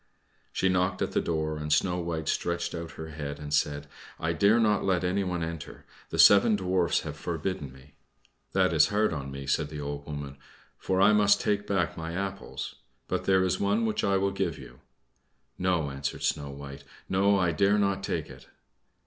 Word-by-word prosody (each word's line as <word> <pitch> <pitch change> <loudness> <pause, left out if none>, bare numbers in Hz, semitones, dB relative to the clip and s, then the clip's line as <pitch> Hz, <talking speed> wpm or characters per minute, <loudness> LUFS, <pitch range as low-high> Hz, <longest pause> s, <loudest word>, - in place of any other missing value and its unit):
She 95 - +1
knocked 90 0 +1
at - - -2
the - - +1
door, 80 -2 -2
and 75 0 -4
Snow 90 +3 +2
White 80 -2 -3
stretched 85 0 -1
out 85 -1 -6
her 80 0 -8
head 75 -2 -5
and 75 0 -6
said, 75 0 +1 0.3
"I 80 +1 0
dare 100 +7 +4
not 105 -3 +2
let 95 -2 +1
anyone 90 -2 -1
enter; 80 -2 -7 0.2
the - - -4
seven 105 +2 +7
Dwarfs 90 -3 +1
have 75 -2 -6
forbidden 85 -2 -4
me." 65 +2 -17 0.6
"That - - +3
is - - +5
hard 105 -2 +1
on 70 -3 -5
me," 70 0 -7
said 70 +2 0
the 75 -1 -7
old 70 0 -5
woman, 70 -2 -6 0.4
"for 95 0 0
I 100 +2 +6
must 105 -1 +5
take 105 0 0
back 90 -7 0
my 80 0 -5
apples; 100 +2 -5 0.3
but - - -2
there 95 -1 +4
is 95 0 0
one 100 +3 +1
which 110 -1 -1
I 100 -1 +3
will 100 +1 +1
give - - -2
you." 60 +1 -12 0.8
"No," 85 -6 +1
answered 70 0 -4
Snow 70 -1 -1
White; 70 0 -9 0.2
"no, 100 +2 +3
I 90 -3 +2
dare 100 +6 +3
not 100 -1 +1
take - - -2
it." - - -13
85 Hz, 190 wpm, -28 LUFS, 75-95 Hz, 0.8 s, seven